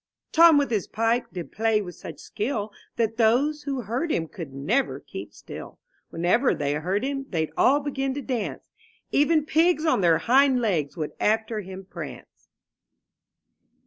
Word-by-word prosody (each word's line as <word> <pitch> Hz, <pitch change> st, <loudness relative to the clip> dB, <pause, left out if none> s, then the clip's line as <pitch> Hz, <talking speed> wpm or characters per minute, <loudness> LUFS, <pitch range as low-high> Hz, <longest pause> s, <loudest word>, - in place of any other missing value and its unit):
'* -, -, -60 dB
Tom 330 Hz, -1 st, +7 dB
with 285 Hz, -3 st, +1 dB
his 210 Hz, -4 st, 0 dB
pipe 230 Hz, +2 st, 0 dB
did 175 Hz, -3 st, -7 dB
play 225 Hz, -1 st, +1 dB
with 180 Hz, -4 st, -6 dB
such -, -, -9 dB
skill 215 Hz, -2 st, -3 dB, 0.2 s
That 225 Hz, -1 st, 0 dB
those 260 Hz, +7 st, +3 dB
who 275 Hz, -3 st, -3 dB
heard 245 Hz, +9 st, -2 dB
him 165 Hz, -, 0 dB
could 165 Hz, -5 st, -8 dB
never 195 Hz, -, 0 dB
keep -, -, -9 dB
still; -, -, -10 dB, 0.3 s
Whenever 180 Hz, +11 st, +2 dB
they 145 Hz, -1 st, -1 dB
heard 180 Hz, +8 st, -1 dB
him, 275 Hz, 0 st, -3 dB
they'd 160 Hz, -4 st, -2 dB
all 285 Hz, +3 st, +4 dB
begin 270 Hz, -2 st, -2 dB
to 285 Hz, -, -4 dB
dance; 245 Hz, -4 st, -4 dB, 0.4 s
Even 300 Hz, +1 st, +3 dB
pigs 325 Hz, +1 st, +2 dB
on 315 Hz, -10 st, +3 dB
their 170 Hz, -3 st, +4 dB
hind 265 Hz, +1 st, +4 dB
legs 175 Hz, -, -1 dB
would 155 Hz, -2 st, -3 dB
after 220 Hz, +1 st, +1 dB
him 190 Hz, 0 st, -9 dB
prance. 150 Hz, -9 st, -10 dB
225 Hz, 165 wpm, -25 LUFS, 185-275 Hz, 0.4 s, Tom